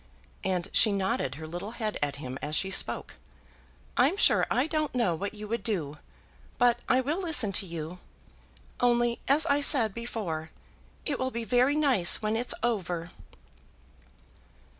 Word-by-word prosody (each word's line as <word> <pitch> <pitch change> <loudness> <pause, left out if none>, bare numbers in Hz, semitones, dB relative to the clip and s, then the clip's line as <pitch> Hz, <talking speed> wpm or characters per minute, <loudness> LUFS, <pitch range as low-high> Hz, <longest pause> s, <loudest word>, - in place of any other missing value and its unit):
And 180 -2 -1
she 215 - +5
nodded 190 -9 -1
her 160 +2 -8
little 175 +7 -6
head 215 -3 -2
at 145 -1 -1
him, 135 -2 -7
as 150 +1 -3
she 190 +3 0
spoke. - - +1 0.8
"I'm 280 +10 +3
sure - - +4
I 255 - +2
don't 310 -3 -2
know 230 -8 +2
what 200 +6 -4
you 210 0 -7
would 230 +2 -2
do. 155 -9 -2 0.6
But 240 -1 +3
I 260 - +4
will 295 +7 -2
listen 290 - +2
to 195 +1 0
you. 170 +1 -6 0.8
Only, 240 -1 +2
as 295 +3 +4
I 285 -2 +2
said 250 -8 +5
before, 195 -9 -5 0.6
it 290 -4 -1
will 260 - -1
be 235 -2 -4
very 250 +6 +2
nice 265 - +2
when 215 0 -1
it's 240 +2 +1
over." 180 -7 -2
220 Hz, 160 wpm, -28 LUFS, 175-255 Hz, 0.8 s, she